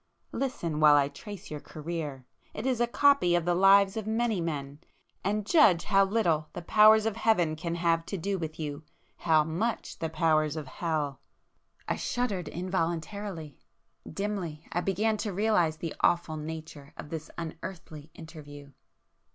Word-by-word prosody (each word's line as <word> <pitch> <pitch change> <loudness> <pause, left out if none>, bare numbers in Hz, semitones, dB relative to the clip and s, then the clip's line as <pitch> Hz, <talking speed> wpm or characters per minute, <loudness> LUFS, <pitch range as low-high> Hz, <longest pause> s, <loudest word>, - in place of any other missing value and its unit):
Listen, 170 - -3
while 150 -1 +7
I 140 -1 +3
trace 200 +6 -10
your 150 - -4
career!—it 155 - -7
is 255 -3 0
a 240 - +3
copy 275 -8 +4
of 175 -1 0
the 175 - +2
lives 195 +2 +5
of 220 -1 -4
many 220 -3 0
men;—and 165 +7 -5
judge 210 - +5
how 195 -1 +4
little 175 -7 +1
the - - -7
powers 215 +3 +6
of 225 -1 -1
Heaven 180 -9 +2
can 165 +2 -4
have 165 -1 +1
to 195 - -3
do 195 +2 -2
with 160 -1 -6
you!—how 155 +1 -1
much 175 +10 -3
the 160 - -2
powers 155 -1 +1
of 155 -2 -5
Hell!" 150 -2 -3 0.7
I - - -1
shuddered 205 -9 -2
involuntarily;—dimly 175 0 -5
I 175 - 0
began 215 +4 0
to 205 -2 -3
realize 180 -6 +2
the 165 0 -5
awful 170 -2 +2
nature 155 -2 -8
of 150 - -9
this 160 -1 -6
unearthly 160 -2 -8
interview. 145 -3 -11
170 Hz, 145 wpm, -29 LUFS, 155-200 Hz, 0.7 s, while